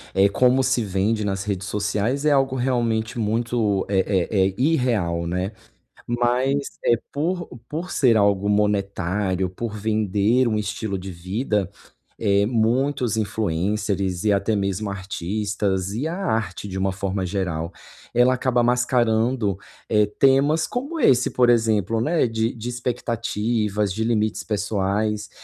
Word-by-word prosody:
eh, 95 +1 +5
como 125 +5 +3
se 125 -3 +1
vende 105 +3 0
nas 95 -1 -2
redes 100 -2 -3
sociais 105 +7 -1
é 150 - +4
algo 135 -1 +2
realmente 120 -2 0
muito 110 -2 0
é 100 -1 +1 0.3
é 95 -2 +3
é 95 - -4
irreal, 115 - +1
né, 90 +3 -2 0.6
mas, 125 +4 0
eh, 120 - +4
por 170 +4 -2 0.2
por 165 +4 -5
ser 120 -5 +3
algo 100 -1 +2
monetário, 100 -2 0
por 110 +3 -5
vender 110 +3 +1
um 110 - 0
estilo 105 -1 -3
de 95 +1 -7
vida, 95 +3 -2 0.5
eh, 100 -1 +3
muitos 120 +1 +1
influencers 100 -1 -1
e 105 - +4
até 100 +2 +1
mesmo 100 +1 -1
artistas 100 0 -2
e 125 +9 -2
a 170 - -3
arte 110 - -2
de 95 - -5
uma 95 0 0
forma 95 0 -2
geral, 90 -3 -2 0.4
ela 125 +2 +4
acaba 125 -1 +1
mascarando, 120 -3 +1 0.3
eh, 105 -1 +4
temas 140 +4 +4
como 285 +7 -4
esse, 125 - +4
por 125 -1 +3
exemplo, 110 -2 +2
né, 155 +3 +2
de 115 0 -1
de 120 +1 -6
expectativas, 115 -4 -1
de 110 +4 -2
limites 110 -2 0
pessoais, 105 +1 -1
110 Hz, 140 wpm, -23 LUFS, 100-120 Hz, 0.6 s, eh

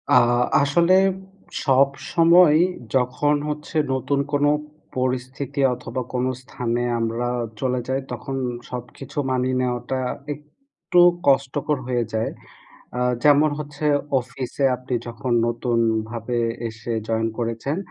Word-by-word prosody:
আ - - +9 0.5
আসলে 170 +6 +3 0.7
সবসময় 155 +5 +4 0.4
যখন 130 +4 +2
হচ্ছে 150 +1 -4 0.2
নতুন 140 +2 0
কোনো 145 0 +3 0.5
পরিস্থিতি 130 +2 -2
অথবা 125 +1 -5
কোনো 125 +1 0
স্থানে 120 -1 -3 0.2
আমরা 115 +2 -1 0.3
চলে 125 -1 0
যাই, 130 +1 0
তখন 135 -2 -5 0.3
সবকিছু 125 +3 -8
মানিয়ে 130 0 +1
নেওয়াটা 125 +1 -2 0.3
একটু 175 - -3 0.3
কষ্টকর 140 +2 +2
হয়ে 120 -2 +1
যায়। 110 0 0 0.7
আ - - -1 0.2
যেমন 150 +1 +6
হচ্ছে 150 0 -4 0.3
অফিসে 125 +3 -4
আপনি 125 0 -5
যখন 120 +1 -3
নতুনভাবে 115 0 -1 0.3
এসে 115 +1 -6 0.2
জয়েন 115 0 +1
করেছেন, 115 +5 -2
130 Hz, 105 wpm, -23 LUFS, 120-145 Hz, 0.7 s, আ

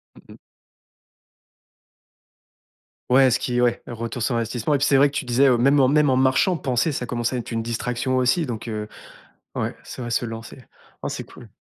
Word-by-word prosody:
Mmh - - -17
mh. - - -17 2.7
Ouais, 130 +1 +6
ce 125 - +2
qui 125 -1 -2
ouais, 120 -1 +1
le 120 - -7
retour 115 +1 -5
sur 120 +2 0
investissement 115 +4 -1
et 140 - +2
puis, 140 - +1
c'est 135 - +4
vrai 145 - +6
que 140 - -9
tu - - -1
disais: 125 +3 +3
«Heu, 125 - +4
même 140 +4 +3
en 130 - +5
même 150 0 +3
en 130 - +2
marchant, 130 +7 +2
penser, 130 +3 0
ça 125 -2 -3
commençait 120 +1 -2
à - - -1
être 120 - -6
une 115 0 -1
distraction 125 +2 -2
aussi» 130 +7 +2
donc 120 -2 -6
heu, 105 -1 -4 0.7
ouais, - - -2
c'est - - -9
vrai, 120 - -5
se 120 +1 0
lancer. 115 +2 -8 0.4
Oh, - - -3
c'est - - -5
cool. - - -14
125 Hz, 210 wpm, -23 LUFS, 120-135 Hz, 2.7 s, Ouais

